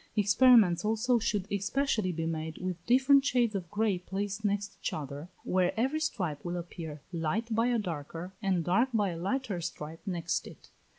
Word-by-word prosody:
Experiments 205 Hz, -4 st, +5 dB
also 225 Hz, +3 st, +2 dB
should 205 Hz, -3 st, -1 dB
especially 205 Hz, 0 st, 0 dB
be 165 Hz, -1 st, -3 dB
made 160 Hz, -1 st, -3 dB
with 180 Hz, -2 st, -4 dB
different 265 Hz, +3 st, +5 dB
shades 245 Hz, -5 st, +2 dB
of 185 Hz, -4 st, -4 dB
grey 210 Hz, -2 st, +1 dB
placed 200 Hz, +3 st, -4 dB
next 205 Hz, -1 st, -1 dB
each -, -, -2 dB
other, 145 Hz, +2 st, -6 dB
where 185 Hz, +3 st, +1 dB
every 270 Hz, +6 st, +1 dB
stripe 180 Hz, -, -2 dB
will 175 Hz, 0 st, -3 dB
appear 165 Hz, -4 st, -7 dB
light 185 Hz, +8 st, -1 dB
by 230 Hz, +2 st, +2 dB
a 245 Hz, -1 st, +2 dB
darker, 170 Hz, -2 st, -5 dB
and 190 Hz, -4 st, +1 dB
dark 230 Hz, +9 st, +3 dB
by 205 Hz, -3 st, +2 dB
a 170 Hz, -, -4 dB
lighter 200 Hz, -1 st, -2 dB
stripe 160 Hz, -1 st, -6 dB
next 175 Hz, -2 st, -1 dB
it. -, -, -14 dB
195 Hz, 175 wpm, -30 LUFS, 170-225 Hz, -, Experiments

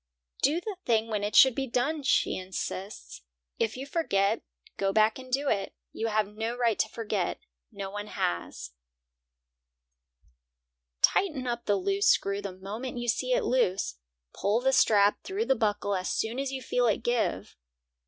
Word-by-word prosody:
"Do 300 Hz, +5 st, +3 dB
the 400 Hz, +1 st, -6 dB
thing 225 Hz, -1 st, +1 dB
when 210 Hz, -2 st, -1 dB
it 205 Hz, -, -2 dB
should 265 Hz, -2 st, +8 dB
be 270 Hz, +2 st, -2 dB
done," 275 Hz, +6 st, 0 dB
she 270 Hz, -, +2 dB
insists. 185 Hz, -, -6 dB, 0.4 s
"If 225 Hz, +1 st, 0 dB
you 265 Hz, -, -5 dB
forget, 205 Hz, -, +1 dB, 0.3 s
go 195 Hz, 0 st, 0 dB
back 215 Hz, +3 st, +3 dB
and 255 Hz, -1 st, -11 dB
do 280 Hz, +3 st, 0 dB
it. 200 Hz, -6 st, -1 dB, 0.2 s
You 225 Hz, -, -2 dB
have 215 Hz, -1 st, +1 dB
no 225 Hz, +3 st, -4 dB
right 235 Hz, -3 st, +1 dB
to 220 Hz, -, +1 dB
forget; 210 Hz, -5 st, -2 dB, 0.3 s
no 200 Hz, -2 st, -6 dB
one 205 Hz, +1 st, -5 dB
has." 85 Hz, -, -3 dB, 2.3 s
Tighten 305 Hz, -10 st, +3 dB
up 240 Hz, -1 st, -3 dB
the 205 Hz, -, +3 dB
loose 395 Hz, -, +1 dB
screw 200 Hz, -, +2 dB
the 200 Hz, -1 st, -5 dB
moment 220 Hz, +7 st, -6 dB
you 240 Hz, 0 st, -4 dB
see -, -, +1 dB
it -, -, +2 dB
is -, -, -4 dB
loose. 190 Hz, -, +1 dB, 0.4 s
Pull 210 Hz, +4 st, 0 dB
the 265 Hz, +1 st, +2 dB
strap 205 Hz, -5 st, +4 dB
through 395 Hz, +4 st, -2 dB
the -, -, +4 dB
buckle 205 Hz, -3 st, 0 dB
as 185 Hz, -1 st, -2 dB
soon 225 Hz, +3 st, -1 dB
as 275 Hz, -1 st, -2 dB
you 265 Hz, -1 st, -5 dB
feel 245 Hz, -1 st, +1 dB
it 220 Hz, +1 st, 0 dB
give. 240 Hz, -1 st, -1 dB
225 Hz, 175 wpm, -28 LUFS, 205-265 Hz, 2.3 s, should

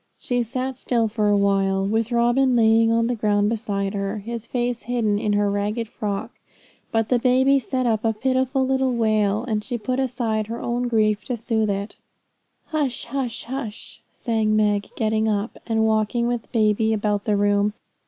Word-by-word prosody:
She 245 Hz, -5 st, -1 dB
sat 255 Hz, +2 st, -3 dB
still 235 Hz, -3 st, 0 dB
for 215 Hz, -1 st, 0 dB
a 205 Hz, -, +4 dB
while, 195 Hz, -1 st, +2 dB
with 225 Hz, +3 st, 0 dB
Robin 240 Hz, +2 st, +3 dB
lying 225 Hz, 0 st, +4 dB
on 230 Hz, 0 st, +2 dB
the 245 Hz, -, 0 dB
ground 210 Hz, -2 st, +1 dB
beside 205 Hz, -3 st, -2 dB
her, 200 Hz, +1 st, -2 dB
his 230 Hz, +2 st, -6 dB
face 245 Hz, -1 st, -2 dB
hidden 220 Hz, -4 st, 0 dB
in 210 Hz, -1 st, 0 dB
her 205 Hz, 0 st, +2 dB
ragged 210 Hz, +3 st, -2 dB
frock; 205 Hz, -3 st, -4 dB, 0.6 s
but 225 Hz, -1 st, 0 dB
the 250 Hz, -, +3 dB
baby 260 Hz, +3 st, +4 dB
set 255 Hz, 0 st, -2 dB
up 225 Hz, -2 st, +1 dB
a 225 Hz, -, +2 dB
pitiful 260 Hz, +3 st, 0 dB
little 265 Hz, -1 st, +1 dB
wail, 215 Hz, -2 st, +1 dB
and 215 Hz, -2 st, -1 dB
she 245 Hz, +1 st, -3 dB
put 250 Hz, +4 st, -2 dB
aside 230 Hz, -5 st, -1 dB
her 230 Hz, +1 st, -5 dB
own 240 Hz, +1 st, -1 dB
grief 215 Hz, -2 st, +1 dB
to 245 Hz, -, -3 dB
soothe 220 Hz, -1 st, 0 dB
it. 200 Hz, +1 st, -3 dB, 0.7 s
'Hush! 290 Hz, -6 st, -1 dB
hush!' 245 Hz, -2 st, -5 dB
sang 220 Hz, -3 st, 0 dB
Meg, 210 Hz, -1 st, +1 dB
getting 220 Hz, -1 st, +1 dB
up, 210 Hz, +1 st, -2 dB
and 220 Hz, -1 st, +1 dB
walking 220 Hz, +2 st, +1 dB
with 240 Hz, -1 st, -3 dB
baby 220 Hz, 0 st, +2 dB
about 205 Hz, -1 st, -1 dB
the 210 Hz, -1 st, +1 dB
room. 205 Hz, 0 st, +2 dB
225 Hz, 175 wpm, -23 LUFS, 210-245 Hz, 0.7 s, a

